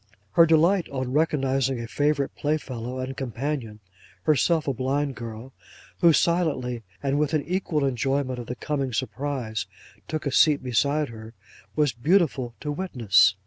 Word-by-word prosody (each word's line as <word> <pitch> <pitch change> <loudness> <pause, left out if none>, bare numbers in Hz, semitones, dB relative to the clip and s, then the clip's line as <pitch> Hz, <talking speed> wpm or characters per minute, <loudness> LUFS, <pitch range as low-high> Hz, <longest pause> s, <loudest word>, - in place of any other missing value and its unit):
Her 165 0 +6
delight 170 +4 +3
on 130 -2 -3
recognising 135 -4 +1
a 115 - -5
favourite 145 +2 0
playfellow 130 -5 -3
and 130 +1 -4
companion—herself 120 - -2
a 140 - +1
blind 135 +3 -1
girl—who 120 +8 -2
silently, 145 -8 +1 0.2
and 140 +1 +1
with 150 +1 +1
an 150 - +1
equal 170 -5 0
enjoyment 135 0 -1
of 120 - -7
the 125 - -4
coming 135 -1 -2
surprise, 125 -1 -3 0.4
took 155 -1 -3
a 140 - 0
seat 145 0 +4
beside 140 +4 +1
her, 110 0 -10 0.4
was 150 -4 +2
beautiful 135 -3 +1
to 150 - -3
witness. 120 - +3
135 Hz, 140 wpm, -25 LUFS, 120-150 Hz, 0.4 s, Her